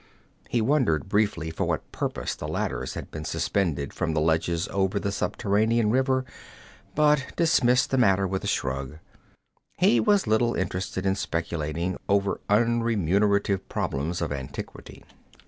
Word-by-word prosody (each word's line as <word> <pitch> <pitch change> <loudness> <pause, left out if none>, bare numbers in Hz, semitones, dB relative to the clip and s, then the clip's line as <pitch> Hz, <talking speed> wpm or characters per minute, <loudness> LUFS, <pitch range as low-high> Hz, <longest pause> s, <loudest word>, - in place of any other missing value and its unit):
He 120 - +1
wondered 115 - +2
briefly 100 -5 0
for 80 - -2
what - - -3
purpose - - -3
the - - -6
ladders - - -3
had - - -7
been 75 - -6
suspended 75 -2 -1
from 80 -2 -2
the - - +2
ledges 80 +2 +1
over 95 +1 0
the 100 - -2
subterranean 105 +3 +1
river, 130 +1 +2 0.7
but 150 -2 +3
dismissed 125 -7 +3
the 135 - +2
matter 100 -4 +4
with 95 0 -2
a - - -3
shrug. 65 +2 -2 0.8
He 120 - +4
was 200 - +3
little 115 +2 +2
interested 95 +1 -3
in 95 - +3
speculating 85 -1 -3
over 100 0 +1
unremunerative 105 -3 +2
problems 80 +6 -2
of 80 - -3
antiquity. 65 -2 -7
100 Hz, 140 wpm, -26 LUFS, 85-115 Hz, 0.8 s, matter